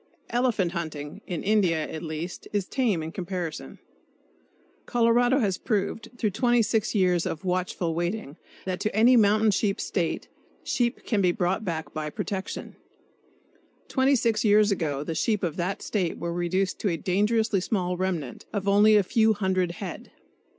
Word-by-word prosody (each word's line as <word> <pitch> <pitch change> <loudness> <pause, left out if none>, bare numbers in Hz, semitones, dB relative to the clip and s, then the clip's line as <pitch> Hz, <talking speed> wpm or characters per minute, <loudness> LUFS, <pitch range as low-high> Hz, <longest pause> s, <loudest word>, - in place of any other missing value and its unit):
Elephant 235 -7 +1
hunting 155 0 -5
(in 175 -5 -4
India, 185 -7 +2
at 160 - -6
least) 160 +2 -6
is 205 -3 0
tame 215 -9 0
in 160 - -5
comparison. 175 -3 -5 1.1
Colorado 245 +2 +3
has 200 -8 0
proved, 215 +1 -2
through 215 -4 0
26 230 -1 +1
years 180 -3 +2
of 165 - -5
watchful 180 -2 -1
waiting, 175 -2 -3 0.3
that 185 -1 -2
to 215 - -2
any 235 +4 +6
mountain 215 -1 +4
sheep 200 0 0
State, 170 -4 -2 0.4
sheep 240 0 -1
can 215 -4 +1
be 180 -2 +4
brought 180 +4 -1
back 165 -5 -4
by 155 -1 -3
protection. 190 +5 -5 1.1
Twenty 270 +1 +3
six 230 -3 +1
years 210 -1 +5
ago 150 -7 -1
the 165 - -3
sheep 210 +6 0
of 165 -4 -1
that 180 +2 -2
State 185 -6 -1
were 170 0 -3
reduced 180 +2 -1
to 205 - 0
a 170 - -1
dangerously 210 +4 +1
small 180 -2 -1
remnant, 175 -8 -3
of 200 -2 -3
only 205 +2 +6
a 205 - +5
few 220 +2 +3
hundred 185 -3 0
head. 185 -1 -7
190 Hz, 155 wpm, -26 LUFS, 175-215 Hz, 1.1 s, any